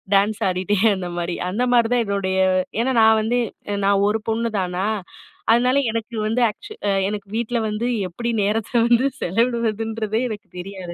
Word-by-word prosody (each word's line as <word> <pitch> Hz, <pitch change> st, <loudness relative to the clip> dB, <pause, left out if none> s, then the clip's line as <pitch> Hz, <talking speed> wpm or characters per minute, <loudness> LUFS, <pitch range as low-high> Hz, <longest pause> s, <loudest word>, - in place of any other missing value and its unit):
Dance 205 Hz, +2 st, +2 dB
ஆடிட்டே 185 Hz, +3 st, 0 dB, 0.2 s
அந்த 180 Hz, -2 st, -5 dB
மாதிரி. 175 Hz, 0 st, -2 dB, 0.2 s
அந்த 235 Hz, +7 st, 0 dB
மாதிரிதான் 240 Hz, 0 st, +3 dB
என்னுடைய 195 Hz, -2 st, -1 dB, 0.4 s
ஏனா 260 Hz, +2 st, +1 dB
நான் 220 Hz, 0 st, +6 dB
வந்து 240 Hz, +3 st, +1 dB, 0.5 s
நான் 200 Hz, 0 st, +3 dB
1 220 Hz, 0 st, -1 dB
பொண்ணு 230 Hz, +1 st, 0 dB
தானா, 180 Hz, +1 st, -2 dB, 0.7 s
அதனால 250 Hz, +3 st, +3 dB, 0.2 s
எனக்கு 230 Hz, +1 st, -4 dB
வந்து 235 Hz, +3 st, 0 dB
ஆக்சு 415 Hz, -, -10 dB, 0.2 s
அ -, -, +3 dB, 0.2 s
எனக்கு 205 Hz, -1 st, -5 dB
வீட்ல 235 Hz, +1 st, -1 dB
வந்து 210 Hz, +3 st, -2 dB, 0.2 s
எப்டி 235 Hz, +7 st, -4 dB
நேரத்த 210 Hz, +2 st, -1 dB, 0.2 s
வந்து 240 Hz, +3 st, +4 dB, 0.2 s
செலவிடுவதுன்றதே 225 Hz, +1 st, 0 dB
எனக்கு 210 Hz, -1 st, -7 dB
தெரியாது. 185 Hz, -2 st, -7 dB
220 Hz, 155 wpm, -22 LUFS, 200-235 Hz, 0.7 s, நான்